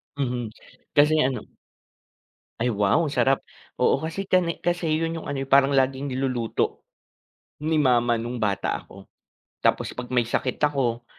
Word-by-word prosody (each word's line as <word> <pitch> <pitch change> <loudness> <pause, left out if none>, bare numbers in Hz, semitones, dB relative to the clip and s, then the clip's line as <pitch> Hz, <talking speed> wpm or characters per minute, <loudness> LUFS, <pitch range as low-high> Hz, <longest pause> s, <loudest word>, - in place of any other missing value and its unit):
Mhm. 125 -4 -2 0.5
Kasi 150 +1 +5
ano. 130 -3 -1 1.2
Ay 120 +1 +1
wow, 105 +11 +2
sarap, 135 -2 +1 0.3
oo. - - +2
Kasi 165 +5 -4
kani 180 -3 +1
kasi 175 -1 0
yun 165 +1 -1
yung - - -7
ano 135 -1 -2
yung - - -22
parang 140 0 +5
laging 135 +1 +1
niluluto 130 -3 -1 0.8
ni 155 +1 +1
mama 120 -4 +3
nung 120 +1 -4
bata 100 -2 -1
ako. 95 0 -15 0.6
Tapos - - +1
'pag 125 0 -7
may 125 -2 +2
sakit 125 +2 -1
ako 130 -5 0
135 Hz, 145 wpm, -24 LUFS, 120-150 Hz, 1.2 s, Kasi